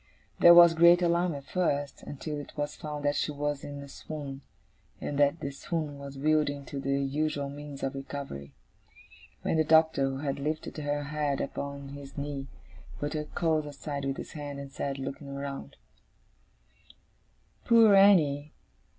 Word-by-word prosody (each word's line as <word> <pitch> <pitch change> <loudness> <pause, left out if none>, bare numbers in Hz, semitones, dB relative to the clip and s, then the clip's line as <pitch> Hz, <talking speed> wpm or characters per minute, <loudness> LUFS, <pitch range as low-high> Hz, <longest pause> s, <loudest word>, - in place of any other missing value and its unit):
There 170 0 +9
was 170 -1 +9
great 170 +2 +6
alarm 170 -1 +2
at 140 - -7
first, 145 -6 -1
until 145 +1 -5
it 145 - -10
was 145 0 -2
found 150 -1 -6
that 145 0 +2
she - - 0
was 145 -1 -2
in 145 0 -7
a - - -10
swoon, 140 -1 -7 0.6
and 145 - -3
that 145 +3 +3
the 140 - -3
swoon 150 0 -4
was 140 0 -8
yielding 145 -1 +1
to 140 - -5
the 140 0 0
usual 145 0 -1
means 145 -1 -8
of 135 +1 -1
recovery; 135 - -7 0.9
when - - +1
the 160 - +4
Doctor, 160 -2 +4
who 135 - -4
had 140 0 -3
lifted 155 +3 -3
her 145 -1 -2
head 145 -1 -1
upon 140 0 -5
his 140 0 -10
knee, 140 -1 -4 0.5
put 145 0 -3
her 150 -1 -2
curls 155 -1 0
aside 145 0 -5
with 135 0 -2
his - - -7
hand, 145 -2 -6
and 140 -1 -8
said, 140 0 -3
looking 135 +1 -6
around: 140 - -6 1.9
'Poor 225 -3 +7
Annie! 155 -8 +5
145 Hz, 165 wpm, -29 LUFS, 140-155 Hz, 1.9 s, There